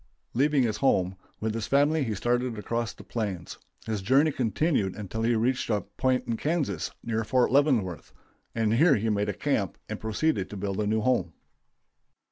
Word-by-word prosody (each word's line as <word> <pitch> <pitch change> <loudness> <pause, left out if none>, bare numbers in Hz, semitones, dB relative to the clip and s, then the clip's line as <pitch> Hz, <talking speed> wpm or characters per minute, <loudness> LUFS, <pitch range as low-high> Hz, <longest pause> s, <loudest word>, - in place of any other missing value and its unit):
Leaving 140 +2 +3
his 110 -3 0
home, 95 -7 +2 0.2
with 110 0 -1
his 115 -2 -3
family 145 +2 +3
he 110 -4 -2
started 120 +2 0
across 115 +2 -2
the - - -13
plains. 100 -7 -4 0.3
His 110 -3 -2
journey 135 +10 +4
continued 125 - 0
until 105 +2 -5
he 115 +1 +2
reached 125 +3 0
a 105 -2 +1
point 125 +5 -1
in 115 - -2
Kansas 145 - -1
near 115 -1 -1
Fort 120 +3 +2
Leavenworth, 125 - +2 0.4
and 110 -1 +1
here 145 +5 +5
he 110 +2 0
made 105 0 -1
camp - - 0
and - - -5
proceeded 110 -2 0
to 105 - -7
build 100 0 -3
a 105 - 0
new 110 +1 +1
home. 105 -9 +1
115 Hz, 175 wpm, -27 LUFS, 105-130 Hz, 0.4 s, here